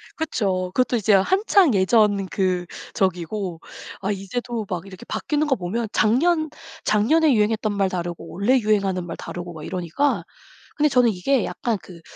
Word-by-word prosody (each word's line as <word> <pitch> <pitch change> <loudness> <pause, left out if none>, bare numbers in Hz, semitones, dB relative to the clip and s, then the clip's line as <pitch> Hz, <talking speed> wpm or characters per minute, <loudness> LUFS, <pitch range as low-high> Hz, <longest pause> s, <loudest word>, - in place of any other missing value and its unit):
그쵸. 190 - -1
그것도 250 +1 +1
이제 215 -1 +2
한창 375 - +4
예전 200 0 +3
그 185 -2 0 0.3
저기고 185 -1 -2 0.4
아 200 +1 -1
이제도 220 +4 -4
막 180 -1 -3
이렇게 190 -2 -11
바뀌는 300 0 -1
거 270 - +2
보면 215 +4 -3
작년 310 +9 +2 0.4
작년에 285 +9 +3
유행했던 215 -1 +1
말 195 -1 +1
다르고 175 -2 -4
올해 225 +9 +2
유행하는 200 -5 0
말 165 - -6
다르고 175 0 -7
막 155 -2 -9
이러니까. 185 - -1 0.5
근데 300 0 +3
저는 250 -3 +4
이게 225 +7 +1
약간 230 -3 -2
그 170 +1 -13
205 Hz, 325 characters per minute, -23 LUFS, 185-250 Hz, 0.5 s, 한창